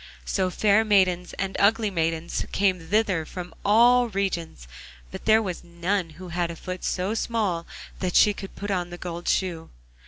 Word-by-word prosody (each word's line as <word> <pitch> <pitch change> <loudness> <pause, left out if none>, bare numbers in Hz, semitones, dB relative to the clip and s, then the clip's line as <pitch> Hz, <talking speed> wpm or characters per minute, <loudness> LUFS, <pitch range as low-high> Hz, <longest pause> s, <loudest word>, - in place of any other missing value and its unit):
So 190 -2 0
fair 210 +3 +3
maidens 185 -4 +2
and 195 0 -3
ugly 215 +1 +3
maidens 165 -1 -1
came 185 -5 0
thither 200 -5 +2
from 180 +3 -8
all 240 +4 +5
regions, 175 - -3 0.4
but - - -8
there 220 0 +5
was 185 -4 -5
none 170 +1 -2
who 185 0 -9
had 175 0 -1
a 170 - -6
foot 180 +2 -7
so 185 +3 -1
small 210 -7 -1 0.3
that 180 -2 -2
she 210 - +6
could 195 -1 -9
put 205 0 -4
on 180 -2 -1
the 175 - -8
gold 175 -1 -6
shoe. 170 -4 -1
185 Hz, 175 wpm, -25 LUFS, 175-205 Hz, 0.4 s, she